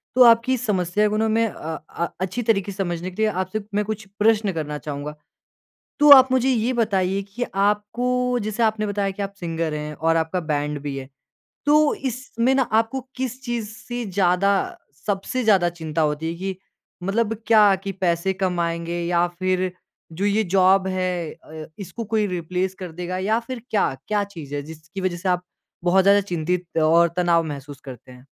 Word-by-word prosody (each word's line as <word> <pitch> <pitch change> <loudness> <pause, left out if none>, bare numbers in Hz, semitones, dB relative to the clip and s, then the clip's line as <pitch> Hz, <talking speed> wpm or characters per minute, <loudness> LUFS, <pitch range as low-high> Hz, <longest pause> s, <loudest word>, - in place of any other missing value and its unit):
तो 255 - +8
आपकी 235 +2 +5
समस्या 210 -3 +1
को 215 - -1
ना 220 - +2
मैं 225 +1 +2
अ 160 -6 -6
अ, 170 - -2
अच्छी 190 +6 -2
तरीके 205 -3 +1
से - - -10
समझने 175 -1 -3
के 185 - -5
लिए 220 - +3
आपसे, 185 +3 -2
मैं 210 0 +1
कुछ 215 0 -4
प्रश्न 215 -1 +3
करना 150 -2 -3
चाहूँगा। 150 0 -6 0.8
तो 295 0 +6
आप 260 -1 +7
मुझे 260 0 +3
ये 245 0 +1
बताइए 195 -4 +1
कि, 200 +5 -5
आपको 245 +5 +1
जैसे 215 +2 -1
आपने 215 -1 +1
बताया 200 -1 -1
कि 195 - -7
आप 200 - -5
सिंगर 165 -2 -2
हैं 150 0 -4
और 165 +1 +1
आपका 165 +3 0
बैंड 150 -2 -2
भी 145 -2 -4
है। 135 0 -7 0.6
तो 300 0 +5
इसमें 255 -1 -1
ना 270 - +3
आपको 225 +3 0 0.2
किस 260 -1 -4
चीज़ 235 -4 -3
से 240 +2 -5
ज़्यादा, 195 0 +1 0.3
सबसे 205 +5 -1
ज़्यादा 195 -6 +4
चिंता 160 -2 -3
होती 150 +1 0
है 170 - -6
कि 190 0 -3 0.5
मतलब 215 +4 0
क्या 210 -3 +6
कि 195 - -3
पैसे 185 0 0
कमाएँगे 170 -2 -1
या 175 0 +2
फिर 185 0 0 0.4
जो 180 +5 -2
ये 205 +2 +2
जॉब 190 0 +4
है 185 -3 -2
अ, 155 0 -10
इसको 195 +4 -6
कोई 220 0 0
रिप्लेस 180 +1 -2
कर 180 -3 -6
देगा 180 +2 -4
या 210 +5 +1
फिर 235 +1 -7
क्या, 205 -9 +1
क्या 210 -1 +1
चीज़ 160 -8 -8
है 145 - -2
जिसकी 160 +5 -9
वजह 185 -2 -1
से 185 +2 -2
आप 180 0 +1 0.4
बहुत 185 +2 +4
ज़्यादा 200 +1 +5
चिंतित 180 -2 -3
और 170 +2 +5
तनाव 170 -2 +3
महसूस 145 -2 -7
करते 130 -1 -11
हैं? 125 +1 -15
190 Hz, 185 wpm, -23 LUFS, 170-220 Hz, 0.8 s, तो